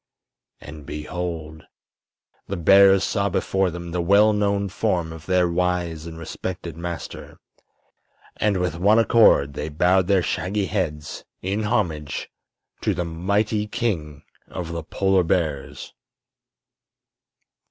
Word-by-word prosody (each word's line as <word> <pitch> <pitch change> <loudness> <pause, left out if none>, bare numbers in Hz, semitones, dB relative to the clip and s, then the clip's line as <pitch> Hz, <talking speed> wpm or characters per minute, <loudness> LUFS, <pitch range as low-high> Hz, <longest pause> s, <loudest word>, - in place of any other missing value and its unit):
And 75 0 -10
behold! 80 0 -5 0.8
the - - -3
bears 95 +3 +6
saw 100 +1 0
before 95 0 0
them 85 0 -7
the 90 0 -1
well 100 +5 +5
known 100 -1 0
form 90 -5 -1
of 80 -2 -12
their 90 -1 +3
wise 85 -2 -1
and 80 -1 -8
respected 85 0 -6
master, 85 0 -7 1.0
and 105 -2 +1
with 90 -2 -2
one 105 +4 +4
accord 110 -11 +5
they 75 +2 -4
bowed 90 +4 +2
their 95 -2 +3
shaggy 100 +3 -1
heads 85 -7 -3 0.2
in 100 +3 -1
homage 80 -9 -2 0.5
to - - 0
the 90 - -2
mighty 100 +6 -1
King 85 - -3 0.2
of 85 -2 -6
the 85 0 -4
Polar 95 +3 +1
Bears. 80 -5 -2
90 Hz, 120 wpm, -23 LUFS, 80-100 Hz, 1.0 s, bears